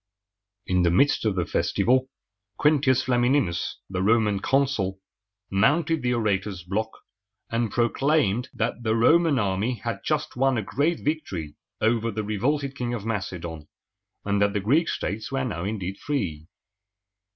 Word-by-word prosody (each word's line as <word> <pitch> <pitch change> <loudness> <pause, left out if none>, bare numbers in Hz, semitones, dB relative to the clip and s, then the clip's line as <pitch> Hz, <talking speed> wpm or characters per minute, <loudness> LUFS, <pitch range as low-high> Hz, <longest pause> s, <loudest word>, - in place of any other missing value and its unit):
In 90 0 +1
the 85 - +3
midst 115 +9 +3
of 105 -3 +1
the 90 -2 0
festival, 130 +9 +1 0.5
Quin´tius 135 -4 +3
Flam 125 -2 +1
i - - +3
ni´nus, 105 -11 +1
the 95 -1 -3
Roman 105 -1 +3
consul, 120 -8 0 0.5
mounted 150 +11 +2
the 125 0 +1
orator's 100 -5 -1
block, 105 +5 -2 0.6
and 115 -1 0
proclaimed 120 -1 +1
that 115 +2 -2
the 110 -1 +1
Roman 160 +6 +4
army 105 +3 0
had 115 0 -4
just 150 -1 -1
won 135 0 +2
a 110 - -1
great 155 - 0
victory 95 - -3 0.3
over 115 +1 +2
the 110 0 -3
revolted 135 +7 -1
King 120 -3 -2
of 110 -3 -6
Macedon, 90 -8 -4 0.6
and 100 0 +1
that 100 0 +3
the 105 - 0
Greek 140 - +2
states 110 +5 -3
were 135 -1 -1
now 95 -7 -3
indeed 100 -2 -4
free. 90 - -3
115 Hz, 150 wpm, -25 LUFS, 95-135 Hz, 0.6 s, Roman